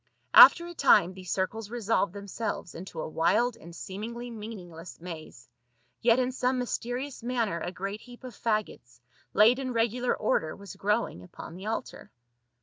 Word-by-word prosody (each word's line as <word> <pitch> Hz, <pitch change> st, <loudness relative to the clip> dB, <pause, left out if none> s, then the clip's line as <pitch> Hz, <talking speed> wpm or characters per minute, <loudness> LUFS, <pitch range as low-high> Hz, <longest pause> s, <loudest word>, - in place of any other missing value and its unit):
After 340 Hz, -, +10 dB
a 345 Hz, -, -8 dB
time 220 Hz, -, +4 dB
these 185 Hz, -2 st, -8 dB
circles 205 Hz, +3 st, -2 dB
resolved 225 Hz, -5 st, 0 dB
them 200 Hz, 0 st, -8 dB
selves 205 Hz, -4 st, -4 dB
into 170 Hz, -1 st, -8 dB
a -, -, -4 dB
wild 220 Hz, +10 st, +2 dB
and 170 Hz, -7 st, -13 dB
seemingly 235 Hz, +7 st, -6 dB
meaningless 185 Hz, -7 st, -9 dB
maze, 160 Hz, -8 st, -9 dB, 0.5 s
yet 230 Hz, 0 st, +5 dB
in 255 Hz, 0 st, +1 dB
some 255 Hz, 0 st, 0 dB
mysterious 250 Hz, +2 st, -3 dB
manner 230 Hz, -8 st, -1 dB
a 175 Hz, -, -4 dB
great 195 Hz, +3 st, -5 dB
heap 245 Hz, +1 st, -14 dB
of 250 Hz, -4 st, -9 dB
faggots, 215 Hz, -, -3 dB, 0.4 s
laid 230 Hz, +5 st, +6 dB
in 260 Hz, -2 st, -3 dB
regular 240 Hz, +2 st, +1 dB
order, 160 Hz, -7 st, 0 dB
was 200 Hz, -3 st, -10 dB
growing 210 Hz, -, -1 dB
upon 90 Hz, -, -10 dB
the 190 Hz, +4 st, -8 dB
altar. 225 Hz, -, -5 dB
215 Hz, 160 wpm, -28 LUFS, 180-245 Hz, 0.5 s, After